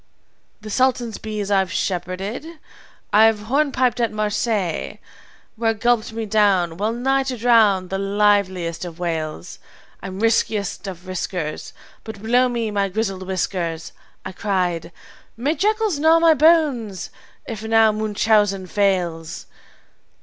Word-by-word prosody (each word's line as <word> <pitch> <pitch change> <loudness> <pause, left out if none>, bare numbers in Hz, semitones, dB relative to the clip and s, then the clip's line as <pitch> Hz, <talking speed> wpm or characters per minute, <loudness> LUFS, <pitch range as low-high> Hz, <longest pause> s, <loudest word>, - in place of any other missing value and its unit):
"'The 215 - -8
sultan's 245 -2 0
bees 210 -2 -4
I've 190 -2 +2
shepherded. 185 - -3 0.7
I've 220 +1 +6
hornpiped 260 0 +1
at 235 -1 +1
Marseilles, 210 -3 -2 0.6
Where 225 0 0
gulped 235 0 +1
me 225 0 -4
down, 195 -6 +2
well 210 +3 0
nigh 265 +3 +1
to 265 -2 -3
drown, 215 -6 +3
the 195 - -2
liveliest 195 -4 +1
of 170 -2 -7
whales. 160 - -4 0.4
I'm 190 0 -7
riskiest 215 -3 0
of 180 -1 -8
riskers, 180 -4 -4 0.3
But, 220 -2 -8
blow 245 +4 +2
my 215 -5 -1
grizzled 195 -2 -3
whiskers!' 175 -3 -3 0.3
I 185 - -5
cried, 180 -4 -2 0.5
'May 275 +7 0
jackals 420 0 0
gnaw 320 +2 +5
my 330 -1 +5
bones 295 - +2 0.3
if 220 -2 -6
now 225 0 +4
Munchausen 210 -2 +1
fails!' 180 -3 -1
210 Hz, 120 wpm, -21 LUFS, 185-230 Hz, 0.7 s, I've